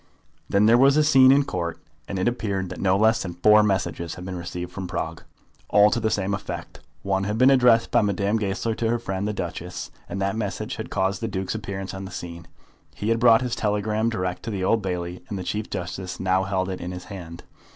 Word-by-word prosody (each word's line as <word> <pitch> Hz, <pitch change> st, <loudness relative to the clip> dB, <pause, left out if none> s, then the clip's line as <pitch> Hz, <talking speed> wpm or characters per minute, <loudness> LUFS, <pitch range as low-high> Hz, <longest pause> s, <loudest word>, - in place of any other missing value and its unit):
Then 100 Hz, +1 st, +3 dB
there 115 Hz, +2 st, +6 dB
was 135 Hz, +2 st, +5 dB
a 155 Hz, -, +5 dB
scene 135 Hz, -3 st, +7 dB
in 140 Hz, +1 st, +5 dB
Court, 85 Hz, -, -3 dB, 0.3 s
and 100 Hz, -, -4 dB
it 95 Hz, -, 0 dB
appeared 100 Hz, -6 st, -1 dB
that 90 Hz, -, -7 dB
no 95 Hz, 0 st, +3 dB
less 110 Hz, +2 st, +3 dB
than 85 Hz, -2 st, -5 dB
four 105 Hz, +4 st, +6 dB
messages 95 Hz, -4 st, -1 dB
had 90 Hz, -, -9 dB
been 95 Hz, 0 st, -5 dB
received 90 Hz, 0 st, -6 dB
from 95 Hz, -1 st, -5 dB
Prague, 85 Hz, -, -4 dB, 0.5 s
all 105 Hz, +1 st, +6 dB
to -, -, +1 dB
the 110 Hz, -1 st, 0 dB
same 100 Hz, -2 st, -1 dB
effect. 100 Hz, -, -6 dB, 0.2 s
One 95 Hz, 0 st, 0 dB
had 105 Hz, +2 st, -2 dB
been 130 Hz, +3 st, +6 dB
addressed 125 Hz, -3 st, +4 dB
by -, -, +4 dB
Madame 100 Hz, +1 st, +1 dB
Goesler 105 Hz, +2 st, -1 dB
to 115 Hz, -, 0 dB
her 120 Hz, -, +2 dB
friend 100 Hz, -3 st, -3 dB
the -, -, 0 dB
Duchess, 90 Hz, -2 st, -5 dB, 0.2 s
and 100 Hz, -, -4 dB
that 95 Hz, +2 st, 0 dB
message 110 Hz, 0 st, -3 dB
had 110 Hz, -, -6 dB
caused 95 Hz, +1 st, -1 dB
the 115 Hz, -, -1 dB
Duke's 95 Hz, -3 st, -3 dB
appearance 95 Hz, -2 st, -5 dB
on 95 Hz, 0 st, -6 dB
the -, -, -7 dB
scene. 85 Hz, -1 st, -8 dB, 0.5 s
He 105 Hz, -, -3 dB
had 115 Hz, 0 st, +2 dB
brought 115 Hz, 0 st, +6 dB
his 125 Hz, -2 st, -2 dB
telegram 105 Hz, +1 st, 0 dB
direct 90 Hz, -5 st, -3 dB
to -, -, -6 dB
the 100 Hz, -4 st, -3 dB
Old 110 Hz, +4 st, +2 dB
Bailey, 90 Hz, -2 st, -4 dB
and 100 Hz, -, -3 dB
the 95 Hz, -, -4 dB
Chief 105 Hz, +4 st, -3 dB
Justice 90 Hz, +1 st, -5 dB
now 95 Hz, 0 st, +1 dB
held 95 Hz, -1 st, -1 dB
it 95 Hz, -, -5 dB
in 90 Hz, -, -5 dB
his 90 Hz, 0 st, -7 dB
hand. 85 Hz, -4 st, -9 dB
100 Hz, 235 wpm, -24 LUFS, 95-110 Hz, 0.5 s, scene